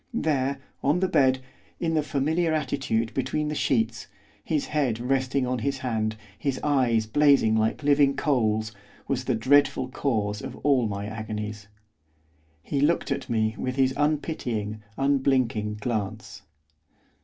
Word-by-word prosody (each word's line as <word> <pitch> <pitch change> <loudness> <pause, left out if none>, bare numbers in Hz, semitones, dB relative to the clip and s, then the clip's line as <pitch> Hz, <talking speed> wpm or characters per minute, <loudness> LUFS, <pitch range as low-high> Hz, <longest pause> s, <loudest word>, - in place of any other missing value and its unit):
There, 140 - 0 0.2
on 145 +5 +2
the 190 - +2
bed, 130 -5 +3 0.4
in 165 -1 0
the 155 - +3
familiar 155 +3 0
attitude 130 -6 -1
between 145 +3 -1
the - - -2
sheets, 120 -5 0 0.4
his 155 -3 -1
head 135 -7 0
resting 130 +1 0
on 125 0 -1
his 135 +4 -1
hand, 110 -4 -1 0.2
his 140 -2 -1
eyes 125 -6 +2
blazing 135 -2 +4
like 110 +6 0
living 140 -1 +4
coals, 110 -7 +1 0.4
was 130 -2 -1
the 130 - +1
dreadful 130 +2 +3
cause 105 -6 -1
of - - -7
all 135 -5 +4
my 100 0 -4
agonies. 105 -1 -5 1.0
He 140 - -1
looked 155 0 +1
at 135 -1 -3
me 110 -2 +1
with 130 0 -2
his 130 -1 +2
unpitying, 125 -8 -1 0.2
unblinking 130 -6 +1
glance. 110 -1 -4
130 Hz, 140 wpm, -26 LUFS, 110-145 Hz, 1.0 s, blazing